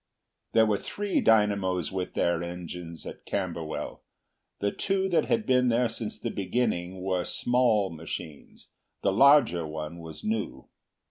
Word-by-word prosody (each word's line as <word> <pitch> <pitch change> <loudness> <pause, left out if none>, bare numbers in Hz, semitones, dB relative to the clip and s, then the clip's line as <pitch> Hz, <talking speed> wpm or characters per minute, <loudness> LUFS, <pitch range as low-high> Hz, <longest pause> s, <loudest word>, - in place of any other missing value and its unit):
There 110 - +6
were 105 -2 +1
three 205 -1 -1
dynamos 100 -6 +2
with 95 -1 -4
their 85 -1 +1
engines 85 -1 -7
at - - -8
Camberwell. 85 -5 -3 0.6
The 100 0 0
two 190 -1 0
that 175 - +3
had 230 -2 +1
been 125 -1 +3
there 120 0 +2
since 110 -1 -5
the 115 - -3
beginning 95 -3 -1
were 95 -2 0
small 120 -5 +2
machines; 80 -1 -8 0.3
the 100 - +2
larger 120 - +5
one 75 +2 -6
was 80 -2 -9
new. 110 0 -3
95 Hz, 140 wpm, -28 LUFS, 85-115 Hz, 0.6 s, There